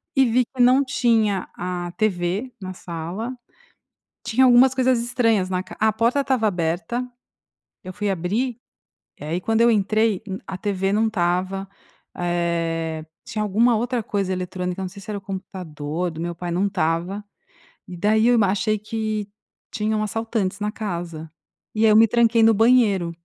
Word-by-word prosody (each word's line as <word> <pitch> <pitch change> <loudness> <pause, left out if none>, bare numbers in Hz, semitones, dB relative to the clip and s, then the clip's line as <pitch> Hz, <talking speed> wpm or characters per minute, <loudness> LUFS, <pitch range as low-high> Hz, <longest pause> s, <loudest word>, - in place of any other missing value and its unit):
e 270 - +5
vi 245 +1 +2
que 255 0 -4
não 255 +3 +6
tinha 225 -7 +1
a 175 -1 -4
TV 205 +3 -1
na 185 0 -5
sala, 185 +9 -6 0.9
tinha 240 +3 +3
algumas 255 +1 +6
coisas 255 -2 +3
estranhas 230 -5 +1
na 185 -1 -1
ca - - -11
A 220 -1 +3
porta 235 +6 +2
estava 255 -5 +1
aberta, 175 +7 -2 0.8
eu 185 - -7
fui 205 +1 -2
abrir, 210 +8 -1 0.6
e - - -9
aí 165 +4 -2
quando 225 +3 +1
eu 235 - +6
entrei, 215 0 +1
hu 190 0 -4
a 190 - -5
TV 195 0 -1
não 220 +1 +2
estava, 190 0 -1 0.5
eh, 165 -2 -1 0.2
tinha 215 - -4
alguma 225 +4 +3
outra 240 0 -1
coisa 195 -2 -2
eletrônica, 180 0 -4
não 185 - -3
sei 200 +1 -12
se 215 - -12
era 205 - -2
o - - -8
computador 180 -4 -5
do 160 +1 -7
meu 170 0 -3
pai, 175 0 -5
não 190 +4 +1
estava, 180 +2 -1 0.6
e 180 - -8
daí 220 +5 +2
eu 245 - +5
m 215 - +4
achei 210 +3 +1
que 215 -1 -3 0.4
tinham 215 0 -1
assaltantes 215 -2 -2
na 210 0 -1
casa. 170 -7 -5 0.4
E 220 +1 +2
aí 215 - +6
eu - - +5
me 225 +1 +8
tranquei 230 0 +3
no 225 0 +6
banheiro, 215 -6 +3
205 Hz, 170 wpm, -22 LUFS, 180-225 Hz, 0.9 s, me